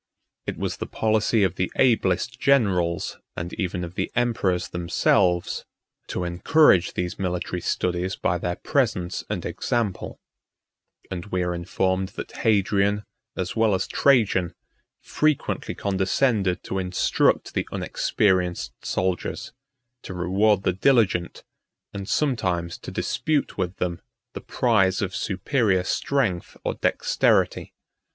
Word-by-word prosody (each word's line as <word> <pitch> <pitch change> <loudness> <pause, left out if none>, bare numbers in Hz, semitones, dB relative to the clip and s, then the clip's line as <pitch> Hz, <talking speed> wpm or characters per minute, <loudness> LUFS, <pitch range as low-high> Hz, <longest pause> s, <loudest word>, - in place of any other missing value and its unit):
39 - - -3
It - - -9
was - - -2
the - - -5
policy 110 0 +1
of 95 -2 0
the 90 - -1
ablest 115 -3 +2
generals, 95 -11 +1 0.2
and 85 0 -4
even 90 -2 -2
of 85 0 -6
the - - -3
emperors 110 -7 0
themselves, 90 +1 +1 0.4
to 90 - -3
encourage 90 - +4
these 90 +2 -3
military 90 -1 -2
studies 90 +2 -1
by 90 0 0
their 90 +1 -2
presence 105 - -1
and - - -3
example; 115 -6 -2 0.9
and 90 +1 -5
we 90 -2 -1
are 90 0 -1
informed 95 +2 -1
that - - -7
Hadrian, 100 -1 +2 0.3
as 90 -1 -3
well 110 -3 +3
as 95 - -1
Trajan, 110 -10 +2 0.5
frequently 155 -2 0
condescended 95 0 +1
to 95 - -3
instruct 90 0 +1
the - - -1
unexperienced 90 -4 0
soldiers, 90 -1 -2 0.5
to 95 - -8
reward 95 +3 +2
the 95 - +1
diligent, 95 -5 +2 0.5
and 100 0 -6
sometimes 90 - 0
to - - -8
dispute 155 -2 -1
with 90 0 -2
them 85 -1 -3 0.3
the - - -6
prize 95 -6 +2
of 95 -1 -3
superior 100 -1 +1
strength 110 -4 -1
or - - -1
dexterity. - - +1
95 Hz, 125 wpm, -24 LUFS, 90-110 Hz, 0.9 s, encourage